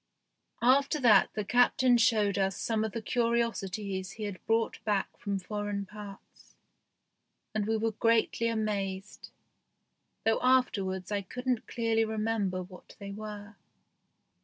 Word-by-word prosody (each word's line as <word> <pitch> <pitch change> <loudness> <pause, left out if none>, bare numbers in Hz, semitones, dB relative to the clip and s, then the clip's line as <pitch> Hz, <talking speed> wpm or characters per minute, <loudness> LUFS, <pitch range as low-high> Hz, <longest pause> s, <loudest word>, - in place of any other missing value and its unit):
After 275 +4 +4
that 215 -6 +6 0.2
Captain 245 +1 +4
showed 225 -4 +3
us 195 -1 0
some 220 -2 0
of 220 - -2
the 230 +1 -5
curiosities 210 -6 -1
he 215 - -7
had 205 -3 -5
brought 225 0 0
back 205 -3 -1
from 200 -3 -3
foreign 205 +1 -3
parts, 205 0 -12 1.0
and 215 -1 -1
we 225 0 +1
were 225 +1 0
greatly 230 +1 +2
amazed, 205 -3 -3 1.0
though 225 0 +3
afterwards 200 -7 +1
I 205 -1 0
couldn't 250 +4 -3
clearly 225 -1 +1
remember 215 -4 -1
what 180 0 -14
they 200 0 -7
were. 210 0 -8
215 Hz, 125 wpm, -30 LUFS, 200-230 Hz, 1.0 s, that